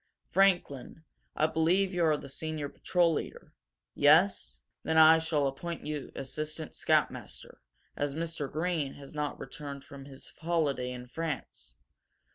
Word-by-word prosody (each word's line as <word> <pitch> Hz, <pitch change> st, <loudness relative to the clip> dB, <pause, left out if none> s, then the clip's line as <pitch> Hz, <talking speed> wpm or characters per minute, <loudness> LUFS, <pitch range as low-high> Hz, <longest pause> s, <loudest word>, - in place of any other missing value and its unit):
Franklin, 175 Hz, -7 st, +2 dB, 0.3 s
I 155 Hz, -, +3 dB
believe 170 Hz, +5 st, +2 dB
you 175 Hz, -1 st, +1 dB
are 155 Hz, -2 st, +3 dB
the 140 Hz, -, -9 dB
senior 150 Hz, +1 st, -4 dB
patrol 175 Hz, +1 st, +2 dB
leader? -, -, -5 dB, 0.4 s
Yes? 160 Hz, +7 st, +4 dB, 0.2 s
Then 160 Hz, 0 st, 0 dB
I 160 Hz, +1 st, +8 dB
shall 160 Hz, -3 st, +1 dB
appoint 160 Hz, +5 st, -4 dB
you 150 Hz, -2 st, -4 dB
assistant 155 Hz, +3 st, -5 dB
scoutmaster, -, -, -1 dB, 0.3 s
as 145 Hz, -1 st, -2 dB
Mr. 160 Hz, -3 st, -3 dB
Greene 160 Hz, -3 st, -1 dB
has 140 Hz, -1 st, -11 dB
not 150 Hz, -1 st, -3 dB
returned 140 Hz, +1 st, -7 dB
from 140 Hz, -1 st, -11 dB
his 135 Hz, -1 st, -11 dB
holiday 150 Hz, -7 st, 0 dB
in 125 Hz, 0 st, -7 dB
France. 140 Hz, -, -5 dB
155 Hz, 135 wpm, -30 LUFS, 140-165 Hz, 0.4 s, I